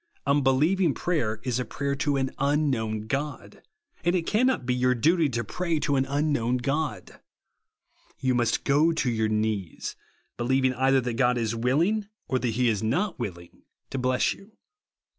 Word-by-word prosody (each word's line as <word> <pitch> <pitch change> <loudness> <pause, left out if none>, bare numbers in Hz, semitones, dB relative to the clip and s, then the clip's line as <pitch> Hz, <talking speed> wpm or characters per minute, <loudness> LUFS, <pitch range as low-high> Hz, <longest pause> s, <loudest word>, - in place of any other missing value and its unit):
Un 140 +1 +3
believing 150 +5 +2
prayer 120 -12 -1
is 125 -1 -1
prayer 140 -1 -2
to 140 0 0
an 135 -1 -1
unhnoivn 130 -7 0
God, 140 +1 -4 0.4
and 175 +2 +2
it 170 -2 0
cannot 220 - +1
be 125 - +1
your 125 0 +2
duty 160 +6 +3
to 120 -2 -2
pray 170 - -2
to 145 -1 +1
an 135 0 +2
unknown 140 -4 0
God. 135 -5 -3 1.0
You 130 -1 0
must 120 -2 +1
go 150 +4 +3
to 145 -6 0
your 110 -1 0
knees, 105 -5 -2 0.4
believing 130 +2 +2
either 135 +1 +3
that 120 -1 -3
God 125 -1 +3
is 115 -1 -1
willing, 165 - +1 0.2
or 130 - 0
that 125 - -1
he 120 +2 +1
is 110 -4 +1
not 165 - -1
willing, 85 -7 -7 0.3
to 135 - -2
bless 125 0 +1
you. 200 +2 -17
130 Hz, 165 wpm, -26 LUFS, 120-150 Hz, 1.0 s, Un